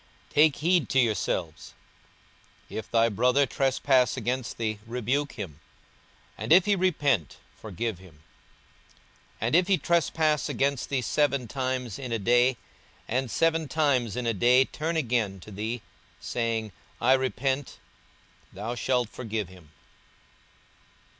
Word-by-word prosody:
42:017:003 - - -23
Take 150 -1 +5
heed 170 +1 +1
to 135 - +3
yourselves: 95 -9 -1 1.0
If 110 - -6
thy 115 0 +3
brother 125 +6 +3
trespass 130 -2 +2
against 125 0 -3
thee, 110 -2 -2
rebuke 125 +5 -1
him; 90 - -7 0.8
and - - -4
if 180 +2 +7
he 205 -1 +3
repent, 145 - +1 0.2
forgive 110 -1 -4
him. 80 -5 -17 1.2
42:017:004 - - -25
And 115 +7 +1
if 180 0 +2
he 195 -2 +3
trespass 160 -3 +1
against 140 -1 -1
thee 135 -2 0
seven 140 +1 +1
times 130 -3 -3
in 130 -3 -6
a 115 - +1
day, 120 +4 +3 0.5
and 130 +2 -1
seven 165 +3 +1
times 135 -8 +1
in 125 -1 -3
a 115 - +1
day 125 +5 +4
turn 160 +4 -3
again 115 -9 0
to 105 - -12
thee, 110 +4 -4 0.4
saying, 115 -2 -2 0.3
I 125 +2 +4
repent; 130 +1 -1 0.7
thou 105 +5 -5
shalt 125 -1 0
forgive 110 -4 -4
him. 90 -5 -16
125 Hz, 135 wpm, -27 LUFS, 110-140 Hz, 1.2 s, if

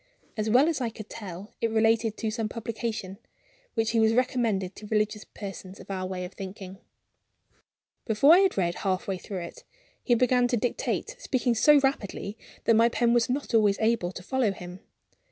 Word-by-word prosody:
As 215 0 -1
well 255 +7 +5
as 320 -5 -1
I 240 - 0
could 215 -1 -10
tell, 200 -2 -8
it 230 - +1
related 225 0 +2
to 220 -2 -2
some 220 -1 -2
publication, 225 -4 -5 0.6
which 225 0 +1
he 230 - +2
was 220 0 +4
recommending 230 -7 +1
to 210 +1 -11
religious 210 0 0
persons 195 -1 -9
of - - -10
our 185 -1 -3
way 185 -1 -4
of 180 - -10
thinking. 190 0 -8 1.3
Before 240 +8 +5
I 355 - +7
had 385 - +2
read 175 -3 +1
half 190 +3 -1
way 190 -2 -2
through 190 0 -6
it, 170 - -10 0.4
he 240 - +3
began 250 +1 +3
to 245 - 0
dictate, 245 - -2
speaking 255 - 0
so 290 +6 +6
rapidly 210 -6 -2 0.3
that 230 - +4
my 230 +1 +5
pen 235 0 +2
was 240 +1 +2
not 270 0 -2
always 210 -3 +4
able 220 -5 +1
to 180 - -8
follow 255 0 +1
him. 180 -1 -9
220 Hz, 190 wpm, -27 LUFS, 195-240 Hz, 1.3 s, I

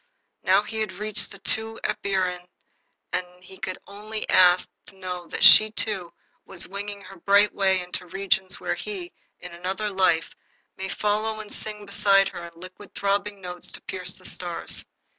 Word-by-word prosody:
Now 195 +2 +4
he 220 +1 -5
had 215 -3 -1
reached 210 +1 -2
the - - -10
true 220 +3 -1
empyrean, 180 -2 -1 0.7
and 180 0 -4
he 190 +1 -12
could 185 - -4
only 215 +2 -6
ask 180 0 +6 0.2
to - - -14
know 180 -2 -6
that - - -3
she, 215 0 +10
too, 200 -5 -1 0.3
was 190 -2 -3
winging 200 +1 -6
her 195 - -12
bright 200 +4 +4
way 190 -2 +3
into 180 0 -3
regions 190 0 0
where - - -1
he, 375 -4 -6 0.3
in 180 - -8
another 190 +5 -3
life, 185 -4 +2 0.4
might 190 0 -5
follow 215 +1 0
and 210 -1 -8
sing 210 -1 -5
beside 195 -1 +4
her 175 - -8
in 170 -1 -16
liquid, 185 +3 -12
throbbing 200 0 0
notes 180 -1 -8
to - - -7
pierce 180 -1 -2
the - - -11
stars. 175 -2 -2
195 Hz, 170 wpm, -25 LUFS, 180-210 Hz, 0.7 s, she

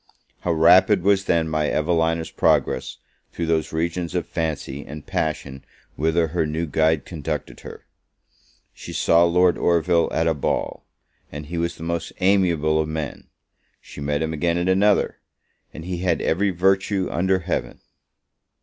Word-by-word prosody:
How 90 - -1
rapid 90 +4 +5
was 100 0 +2
then 85 -1 +1
my 75 -1 0
Evelina's 80 +1 0
progress - - +1 0.3
through 85 - -3
those 80 -1 0
regions 85 +2 -2
of 90 - -1
fancy 75 -4 -4
and 75 +1 -10
passion 70 -3 -3 0.3
whither 80 +1 +1
her 80 -1 -1
new 80 +2 -2
guide 80 0 +1
conducted 80 -5 -5
her! - - -11 0.9
She - - -10
saw 85 +1 +4
Lord 90 +1 +3
Orville 85 0 +2
at 80 - 0
a 80 - +2
ball, 70 - -3 0.4
and 75 +1 -7
he 85 +2 -4
was 85 0 -2
the - - -9
most 85 0 -3
amiable 85 -5 +2
of 75 - -3
men! 80 -3 -5 0.5
She - - -11
met 75 +1 -1
him 80 0 -3
again 85 +2 0
at 85 +1 -1
another, 95 +2 +2 0.5
and 80 - -9
he 90 -1 -3
had 90 -2 0
every 100 +5 +1
virtue 95 +1 +1
under 95 +2 +1
Heaven! 90 -1 -4
85 Hz, 155 wpm, -22 LUFS, 80-90 Hz, 0.9 s, rapid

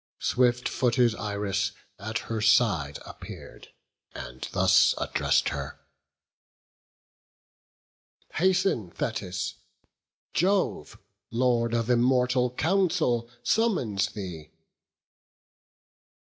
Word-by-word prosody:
Swift 125 -1 +1
footed 120 -2 +2
Iris 100 -2 -2 0.3
at 110 +3 -3
her 115 -1 -4
side 95 - +3
appear'd, - - -11 0.5
And 60 +1 -7
thus - - +4
address'd - - +1
her: - - -6 2.5
"Hasten, 185 - +1
Thetis; 95 -1 -3 0.8
Jove, 190 +3 0 0.3
Lord 120 -1 +1
of 115 -1 0
immortal 125 +1 +3
counsel, 160 -5 +1
summons 125 - +1
thee." 90 -7 -8
115 Hz, 75 wpm, -27 LUFS, 100-130 Hz, 2.5 s, thus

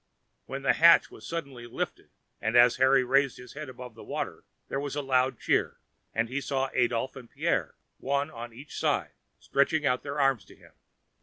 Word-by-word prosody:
Then 135 0 -5
the - - +4
hatch 170 +1 +6
was - - -11
suddenly 140 -8 -5
lifted, - - -5 0.3
and 110 +2 -1
as 120 0 +6
Harry 130 0 +5
raised 135 +1 +2
his 125 -1 -12
head 150 -1 -7
above 125 -2 -10
water 115 - -5 0.2
there 135 - -2
was 140 0 -4
a 145 - -1
loud 130 -2 +1
cheer, - - 0 0.3
and 115 +1 0
he 130 +4 -3
saw 135 -1 -1
Adolphe 125 +1 0
and 120 -3 -14
Pierre, - - -1 0.2
one 140 +3 -1
on 120 0 -8
each 135 +6 -11
side, - - 0 0.2
stretch 140 +3 +1
out 125 -3 +1
their 140 +1 -5
arms 135 -5 +2
to - - -16
him. - - -20
130 Hz, 185 wpm, -28 LUFS, 125-140 Hz, 0.3 s, hatch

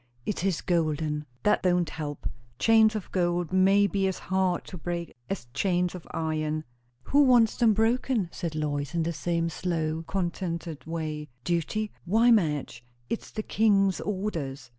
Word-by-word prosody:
"It 200 - -2
is 190 -4 0
golden!" 155 -3 0 0.2
"That 210 - +3
don't 180 -2 +2
help. 150 -2 -5 0.3
Chains 220 - +5
of 210 - -5
gold 175 -1 0
may 195 +2 +5
be 195 0 +1
as 190 - -2
hard 190 -2 0
to 185 - -8
break 170 0 -4 0.2
as 195 -9 -3
chains 180 -2 +1
of 180 -3 -9
iron." 155 -1 -2 0.4
"Who 285 - +3
wants 245 -5 +5
them 230 -3 +4
broken?" 225 -1 +1
said 165 -3 -4
Lois, 145 0 -2
in 165 - +2
the 170 +1 -1
same 165 +2 -1
slow, 165 -2 -2
contented 170 -4 -3
way. 155 -2 -4
"Duty? 180 +5 -1
Why 225 +7 +4
Madge, 150 - +1 0.3
it's 230 - -3
the 215 - -4
King's 195 -4 +3
orders!" 160 -11 -3
175 Hz, 155 wpm, -27 LUFS, 160-200 Hz, 0.4 s, Chains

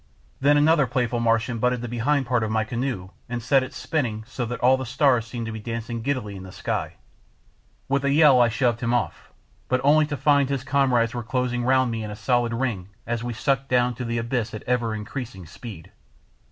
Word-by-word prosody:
Then 145 +2 +4
another 150 -1 +4
playful 120 -1 0
Martian 115 0 +1
butted 125 0 +1
the 120 - -4
behind 130 +4 0
part 125 -1 +1
of 110 - -1
my 110 0 +1
canoe 115 -4 -3 0.2
and 120 0 -2
set 130 +4 +3
it 130 +1 -5
spinning, 120 -12 -2
so 125 0 -4
that 125 - -4
all 130 +2 +5
the 130 - -4
stars 125 -3 +2
seemed 115 0 -5
to 115 - -4
be 110 - -6
dancing 115 +1 -4
giddily 125 -6 -2
in 95 - -8
the 95 0 -10
sky. - - -3 0.9
With 140 +1 0
a 140 - +2
yell 145 -4 +6
I 120 - +5
shoved 120 0 +1
him 120 0 +1
off, 110 -10 -3 0.4
but 130 - +1
only 150 +2 +5
to 145 -1 -3
find 145 -2 +3
his 135 -2 -2
comrades 130 -4 +2
were 120 - -3
closing 125 0 -1
round 130 0 +3
me 115 -1 -3
in 105 - -5
a 105 - -6
solid 120 +1 +1
ring 115 -6 -2 0.2
as 115 0 -2
we 120 -1 -3
sucked 135 +3 0
down 125 0 +2
to 125 - -6
the 115 0 -2
abyss 115 -1 -2
at 110 - -7
ever 120 -3 0
increasing 105 -3 -6
speed. 85 +2 -10
120 Hz, 220 wpm, -24 LUFS, 115-130 Hz, 0.9 s, yell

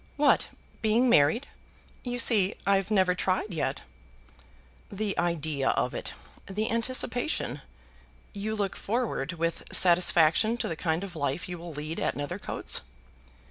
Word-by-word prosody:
"What, 290 -1 +4 0.3
being 230 +3 +3
married? 155 - +4 0.6
You 245 -1 -3
see 215 -5 +4
I've 195 -1 +2
never 190 -4 +3
tried 185 +2 -1
yet." 160 - -2 1.1
"The 205 0 -2
idea 155 -5 0
of - - 0
it, - - -4 0.3
the 210 +3 -2
anticipation, 230 - 0 0.7
You 215 +2 -3
look 200 -3 -2
forward 210 - -2
with 165 0 -2
satisfaction 175 +4 +4
to - - -2
the 165 - -3
kind 160 +2 -1
of 185 -3 -7
life 140 +1 -2
you 175 -1 -6
will 170 -1 -8
lead 150 +2 -5
at - - -1
Nethercoats? 145 0 -2
185 Hz, 135 wpm, -28 LUFS, 165-220 Hz, 1.1 s, What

